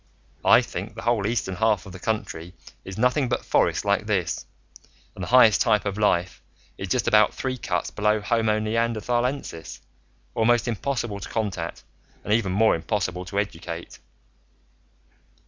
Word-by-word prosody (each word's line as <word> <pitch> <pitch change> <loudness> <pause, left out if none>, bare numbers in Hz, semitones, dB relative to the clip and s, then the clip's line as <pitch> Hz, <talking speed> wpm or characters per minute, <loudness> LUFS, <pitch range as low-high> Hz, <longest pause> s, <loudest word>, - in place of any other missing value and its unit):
"I - - +6
think 100 +5 -6
the - - -8
whole 115 -4 +1
eastern 110 -5 -2
half 105 -3 +2
of 95 - -10
the 95 - -10
country 90 -5 -4 0.3
is 95 -1 -8
nothing 125 +3 +2
but 120 - -2
forest - - +2
like 100 +1 +1
this, 95 -5 -1 0.7
and 95 - -7
the - - -4
highest 115 -6 +6
type 105 -1 +3
of 100 -1 -2
life 90 -4 +1 0.3
is 95 - -6
just 120 +4 0
about 105 0 +4
three 130 -1 -2
cuts 95 -8 -2
below 105 +1 +1
Homo 110 0 +1
Neanderthalensis, 115 - -2 0.5
almost 120 +2 +2
impossible 120 -1 -2
to - - -8
contact, 100 -7 -3 0.4
and 105 - 0
even 110 -4 +1
more 110 +3 +4
impossible 90 +2 -2
to 95 +3 -6
educate." 85 -4 -4
105 Hz, 150 wpm, -24 LUFS, 95-115 Hz, 0.7 s, I